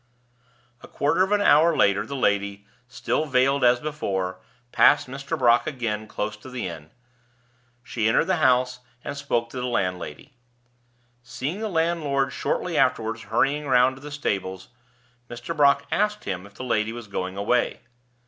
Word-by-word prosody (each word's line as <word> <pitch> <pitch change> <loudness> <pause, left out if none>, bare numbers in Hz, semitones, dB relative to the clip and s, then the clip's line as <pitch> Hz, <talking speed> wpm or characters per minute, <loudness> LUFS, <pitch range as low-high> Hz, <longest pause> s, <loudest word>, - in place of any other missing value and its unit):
A - - -12
quarter 145 +6 0
of 190 - -2
an 205 0 +3
hour 165 -2 +5
later 100 0 +2
the 140 - -5
lady, 100 -4 0 0.2
still 150 +5 -2
veiled 135 +1 +2
as 120 0 +5
before, 100 -11 -3 0.3
passed 145 - +5
Mr. 135 +2 -5
Brock 120 -1 +4
again 115 -7 -3
close 105 0 -4
to 120 +5 -12
the 125 -1 -4
inn. 80 -3 -9 0.9
She 115 -2 -1
entered - - +3
the 185 -1 +1
house, 125 -3 +2 0.2
and - - -5
spoke 120 -5 -2
to 130 - -5
the 125 - -2
landlady. 90 - -3 0.9
Seeing 135 +8 -5
the 220 -1 -3
landlord 160 -6 0
shortly - - -1
afterward 115 0 +1
hurrying 145 +4 0
round 130 0 +4
to - - -14
the 150 - -8
stables, 95 -10 -3 0.6
Mr. 120 0 -6
Brock 140 -1 +4
asked 210 +1 0
him 95 0 -5
if 100 - -21
the - - -7
lady 110 -3 0
was 120 -1 -8
going 95 -1 -4
away. 120 +5 0
125 Hz, 160 wpm, -24 LUFS, 105-145 Hz, 0.9 s, hour